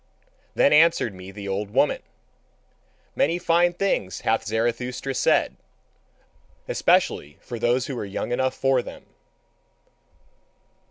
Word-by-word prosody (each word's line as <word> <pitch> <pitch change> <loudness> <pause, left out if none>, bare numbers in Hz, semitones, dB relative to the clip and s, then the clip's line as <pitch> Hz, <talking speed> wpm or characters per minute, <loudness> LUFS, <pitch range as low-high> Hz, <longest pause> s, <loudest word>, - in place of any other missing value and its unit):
Then - - +4
answered 155 -8 +4
me 95 0 -11
the 100 +1 -8
old 100 +1 -3
woman: - - +1 1.1
"Many 165 +5 +1
fine 175 0 +2
things 175 - -1
hath 115 0 0
Zarathustra 120 +4 -2
said, - - +1 1.1
especially 75 0 +1
for 120 -2 -8
those 125 +2 +1
who 135 - -5
are - - -3
young 100 +4 -4
enough 130 +1 0
for 135 -1 +2
them. - - -11
125 Hz, 115 wpm, -24 LUFS, 105-140 Hz, 1.1 s, Then